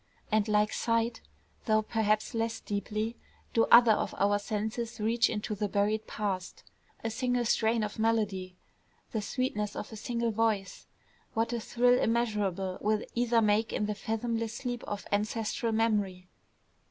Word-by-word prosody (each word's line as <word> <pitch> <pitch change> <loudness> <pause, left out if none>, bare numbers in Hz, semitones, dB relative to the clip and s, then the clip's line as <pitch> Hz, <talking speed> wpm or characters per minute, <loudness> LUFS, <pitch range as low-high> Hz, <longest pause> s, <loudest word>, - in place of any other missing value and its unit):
And 215 0 +2
like 210 0 +2
sight, 230 0 0 0.4
though 215 -1 +3
perhaps 215 -1 0
less 225 0 -1
deeply, 215 +3 -3 0.4
do 225 - +4
other 235 -1 +9
of 215 - 0
our 205 +1 +3
senses 220 +3 -3
reach 230 +2 +2
into 210 0 -3
the 210 0 -1
buried 210 +2 0
past. 195 -3 -3 0.4
A 225 - -1
single 245 +1 0
strain 225 0 +2
of 210 +1 -4
melody, 210 -5 0 0.6
the 220 - -1
sweetness 210 -2 -2
of 210 - -6
a - - -6
single 235 +1 -1
voice 215 -3 -1 0.5
what 225 +1 +1
thrill 245 +1 +2
immeasurable 205 -5 0
will 215 +1 +1
either 235 -1 +2
make 215 +1 +2
in 210 - 0
the 210 - -1
fathomless 225 +1 -2
sleep 245 -1 -4
of 205 -1 -5
ancestral 215 +2 0
memory! 205 -5 0
220 Hz, 145 wpm, -30 LUFS, 210-230 Hz, 0.6 s, other